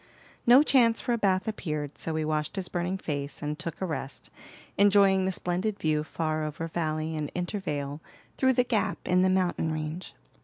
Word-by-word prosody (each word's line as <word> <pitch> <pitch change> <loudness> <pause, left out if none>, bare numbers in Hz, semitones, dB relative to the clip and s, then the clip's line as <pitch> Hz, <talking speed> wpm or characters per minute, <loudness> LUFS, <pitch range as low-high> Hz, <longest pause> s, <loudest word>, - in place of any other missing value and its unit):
No 250 +4 +8
chance 240 -6 +4
for 240 - -1
a - - +1
bath 190 -2 +1
appeared, 150 -9 -4
so 160 - -3
he 155 -1 -1
washed 155 -1 -1
his 190 -3 -4
burning 180 +2 -2
face 145 -5 -4
and 150 +1 -3
took 170 - -5
a 190 - -1
rest, 135 -7 -5 0.4
enjoying 195 -1 +5
the 190 - +1
splendid 185 +3 -2
view 155 -1 +1
far 155 0 -2
over 155 +2 -4
valley 160 -1 -2
and 150 -1 -3
intervale 155 -6 -3 0.3
through 260 0 +3
the 250 - +3
gap 235 -4 0
in 180 0 +4
the 185 - +4
mountain 180 -3 +1
range. 155 +3 -5
175 Hz, 185 wpm, -28 LUFS, 155-195 Hz, 0.4 s, No